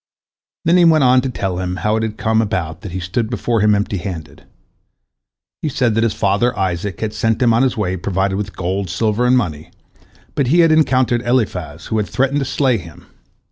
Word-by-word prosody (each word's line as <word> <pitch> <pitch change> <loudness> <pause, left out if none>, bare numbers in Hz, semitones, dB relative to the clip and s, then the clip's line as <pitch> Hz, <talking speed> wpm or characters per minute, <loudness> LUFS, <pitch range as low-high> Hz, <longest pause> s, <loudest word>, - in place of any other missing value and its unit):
" - - -56
Then 170 +2 +4
he 175 - +5
went 160 -3 +5
on 125 0 +5
to 135 - -3
tell 95 -7 -3
him 90 0 -3
how 105 +5 0
it 110 - 0
had 110 -1 -3
come 110 0 +1
about 90 -6 -3
that 100 - -7
he 95 - -4
stood 100 +5 -2
before 120 -2 -1
him 105 0 +4
empty 100 -1 -1
handed. 90 -4 -7 1.2
He 155 - -1
said 125 -4 +1
that 115 +1 +1
his 115 - 0
father 100 +6 +1
Isaac 95 0 -2
had 110 -1 -2
sent 115 0 0
him 120 -3 +3
on 115 - +3
his 130 -3 +1
way 95 -3 -1
provided 95 +1 -1
with 100 0 -4
gold, 95 +1 -2
silver, 110 +5 0
and 125 +1 +4
money, 80 -8 -3 0.6
but 140 -4 0
he 170 +7 +4
had 165 -1 +4
encountered 130 -6 +2
Eliphaz, 95 - -2
who 110 - -2
had 105 - -1
threatened 135 +2 +1
to 135 - -2
slay 130 -3 +1
him. 85 -3 -13
110 Hz, 220 wpm, -18 LUFS, 95-125 Hz, 1.2 s, he